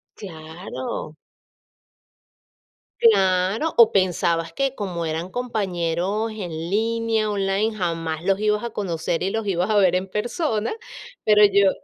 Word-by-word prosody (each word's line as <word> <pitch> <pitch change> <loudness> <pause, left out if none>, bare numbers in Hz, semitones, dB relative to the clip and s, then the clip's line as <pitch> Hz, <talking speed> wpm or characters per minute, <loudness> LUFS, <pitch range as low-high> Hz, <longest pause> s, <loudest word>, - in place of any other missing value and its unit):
Claro. 160 -4 -7 1.8
Claro, 195 - +3
o 230 -1 +7
pensabas 170 -3 +1
que 275 -1 0
como 180 -7 -4
eran 160 +3 -3
compañeros 200 -2 -2
en 200 -5 -6
línea, 220 +6 -1
online, 200 +2 0
jamás 165 -3 -3
los 195 0 +2
ibas 210 +1 +1
a 235 - -4
conocer 170 -5 -2
y 190 - 0
los 225 +1 -2
ibas 185 0 0
a 215 - +2
ver 190 -3 +4
en 185 +1 -1
persona, 225 - -1 0.5
pero, 210 0 +5
yo 200 -1 +4
195 Hz, 125 wpm, -23 LUFS, 170-215 Hz, 1.8 s, o